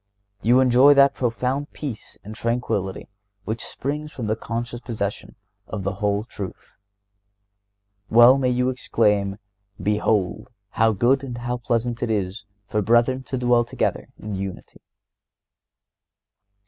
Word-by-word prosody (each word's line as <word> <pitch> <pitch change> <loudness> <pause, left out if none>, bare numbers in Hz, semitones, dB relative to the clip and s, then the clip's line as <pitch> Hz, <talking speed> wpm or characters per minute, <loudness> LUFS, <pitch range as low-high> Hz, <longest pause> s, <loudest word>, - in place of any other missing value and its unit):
You 120 +4 +4
enjoy 130 +3 +6
that 140 0 +6
profound 130 +4 -2
peace 130 -8 -7
and 105 - -8
tranquillity 110 -5 -2 0.4
which 110 +1 -3
springs 150 +3 -4
from 125 -7 -6
the 110 +1 0
conscious 120 +2 -5
possession 105 -5 -4 0.3
of 105 -3 -5
the 100 +2 -1
whole 105 0 +1
truth. 100 -4 -9 1.3
Well 120 +4 +7
may 130 -2 +1
you 125 +1 +1
exclaim: 105 -6 +1 0.4
"Behold 105 +1 0 0.2
how 110 0 +3
good 125 +6 +2
and 125 -3 -6
how 120 +1 -3
pleasant 120 0 -1
it 120 - -1
is 100 -1 -2 0.2
for 105 +1 -1
brethren 120 +4 +3
to 130 - -3
dwell 120 -1 +3
together 120 - -2
in 105 0 -6
unity." 95 -1 -6
120 Hz, 130 wpm, -23 LUFS, 105-125 Hz, 1.3 s, Well